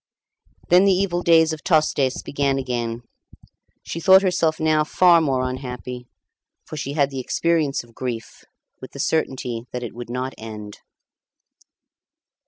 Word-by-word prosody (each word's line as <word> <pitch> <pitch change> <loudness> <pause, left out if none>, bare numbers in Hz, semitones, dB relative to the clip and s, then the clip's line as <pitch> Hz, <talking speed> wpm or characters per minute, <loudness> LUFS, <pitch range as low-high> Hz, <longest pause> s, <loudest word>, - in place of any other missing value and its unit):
Then 180 +3 +6
the 200 - +5
evil 180 -2 0
days 165 -2 +4
of 155 - -8
Tostes 150 -5 +1
began 140 -1 -1
again. 120 -3 -3 0.8
She 165 - -5
thought 190 +3 +6
herself 170 -4 +1
now 155 -1 +2
far 170 +2 +4
more 130 -4 0
unhappy; 125 -1 -6 0.6
for - - -8
she 140 -1 -4
had 140 -2 +1
the 135 - -4
experience 155 +1 0
of 120 -1 -20
grief, 115 -2 -6 0.4
with - - -10
the - - -9
certainty 125 -6 -2
that 125 0 -5
it 120 - -6
would 120 +1 -8
not 125 +2 -3
end. 105 -2 -9
135 Hz, 145 wpm, -22 LUFS, 125-160 Hz, 0.8 s, Then